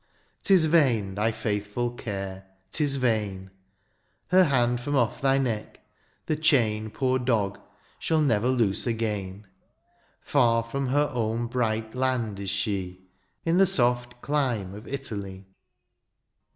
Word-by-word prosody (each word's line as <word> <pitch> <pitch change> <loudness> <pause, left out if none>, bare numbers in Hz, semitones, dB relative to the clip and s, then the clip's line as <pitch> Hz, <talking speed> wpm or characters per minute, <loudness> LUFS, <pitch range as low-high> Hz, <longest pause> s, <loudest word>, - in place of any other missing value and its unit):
^s 185 -5 +5
vain, 130 - +2
thy 105 +3 +1
faithful 105 +2 -2
care, 95 -5 -6 0.2
^tis 145 -3 +1
vain; 105 -7 -1 0.8
Her 185 0 +6
hand, 120 -4 +1
from 145 +3 -2
off 120 -4 +1
thy 135 0 +3
neck, 120 -6 -2 0.5
the 155 - 0
chain, 115 -8 +2
Ppor 130 +2 0
dog, 105 -6 0 0.4
shall 160 -1 +1
never 120 -6 +2
loose 120 -5 +1
again: 105 -4 -3 0.7
Far 115 -5 +2
from 135 +4 -3
her 145 +3 +1
own 115 0 -1
bright 115 -2 -1
land 125 -5 -1
is 100 -1 -4
she. 95 -2 -3 0.4
In 165 +1 +2
the 195 - +6
soft 120 -7 +1
clime 125 -10 -1
of 105 +2 -10
Italy. 100 -8 -6
120 Hz, 125 wpm, -26 LUFS, 105-135 Hz, 0.8 s, Her